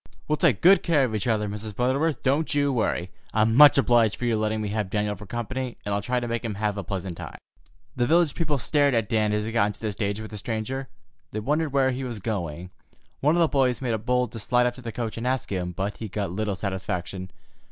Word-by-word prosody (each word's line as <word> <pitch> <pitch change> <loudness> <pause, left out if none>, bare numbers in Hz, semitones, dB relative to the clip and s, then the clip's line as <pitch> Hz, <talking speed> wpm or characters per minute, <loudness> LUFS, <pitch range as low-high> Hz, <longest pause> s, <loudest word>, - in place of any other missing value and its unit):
"We'll 150 - +2
take 135 - +3
good 185 +1 +7
care 155 -5 +3
of 120 -4 -1
each 110 +2 -2
other, 110 -2 +1
Mrs. 105 0 -6
Butterworth; 140 +5 0
don't 145 +3 +1
you 145 -1 +2
worry. 95 -6 -1 0.2
I'm 110 +1 +3
much 145 +3 +8
obliged 120 -5 +4
for 125 - -4
your 115 -2 +2
letting 110 0 0
me 105 -1 -2
have 105 -2 -2
Daniel 105 0 -1
for 105 - -11
company, 120 +3 -4
and 105 - -1
I'll 100 - 0
try 125 +5 0
to 120 - -4
make 115 +1 -2
him 110 -3 -3
have 105 0 -1
a 100 - -4
pleasant 95 -2 -4
time." - - -8 0.6
The 120 -1 +1
village 165 -2 +3
people 155 -4 -1
stared 140 +1 +2
at 115 -2 +1
Dan 110 -1 +1
as 105 0 0
he 115 - -3
got 115 -3 +3
into 105 -1 -6
the 110 -2 -2
stage 100 +1 -2
with 110 0 -7
the 105 - -5
stranger. 125 +5 -3 0.4
They 110 - -4
wondered 150 +6 0
where 135 -1 +3
he 130 +1 -4
was 120 -3 -4
going. 90 -4 -4 0.5
One 150 +4 +3
of 175 - +3
the 165 - +5
boys 130 -4 +1
made 120 -4 -1
bold 125 0 +1
to 115 - -7
slide 125 +4 +2
up 125 - +1
to 130 - -12
the 115 -2 -5
coach 115 -1 -4
and 115 +2 -3
ask 130 -3 -1
him, 90 -2 -2
but 95 +4 -3
he 110 - -5
got 100 -2 -3
little 105 +1 -2
satisfaction. 95 -1 -4
115 Hz, 250 wpm, -25 LUFS, 105-130 Hz, 0.6 s, much